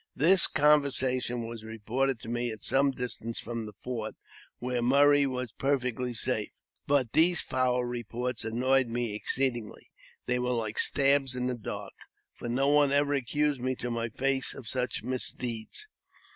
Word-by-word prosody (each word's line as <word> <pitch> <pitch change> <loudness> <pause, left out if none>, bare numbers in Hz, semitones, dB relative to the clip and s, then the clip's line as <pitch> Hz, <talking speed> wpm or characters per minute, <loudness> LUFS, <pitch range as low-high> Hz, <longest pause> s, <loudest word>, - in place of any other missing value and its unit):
This 175 +5 +5
conversation 130 -5 +2
was 115 -1 -8
reported 115 +4 -2
to - - -10
me 120 +1 -2
at 110 -1 -8
some 140 +1 +3
distance 125 -3 -4
from 115 -2 -5
the - - -8
fort, 115 +1 -6 0.4
where 125 0 -2
Murray 140 +3 +5
was 125 -3 -4
perfectly 125 -3 -1
safe. - - 0 0.4
But 140 -5 +1
these 175 +2 +5
foul 125 -1 0
reports 120 0 -4
annoyed 125 +3 +1
me 120 -2 -2
exceedingly. 120 +1 -2 0.3
They 125 0 0
were 125 0 0
like 110 -2 -2
stabs 135 -2 +4
in 125 0 -2
the 125 - 0
dark, 120 -3 -6 0.4
for 120 - -7
no 135 +3 +1
one 145 -1 +4
ever 145 0 +2
accused 145 +1 0
me 130 +1 -1
to 125 0 -4
my 115 0 -2
face 135 +3 0
of 125 - -10
such 125 +2 -1
mis 130 0 -1
deeds. 120 - -4
125 Hz, 160 wpm, -29 LUFS, 120-135 Hz, 0.4 s, This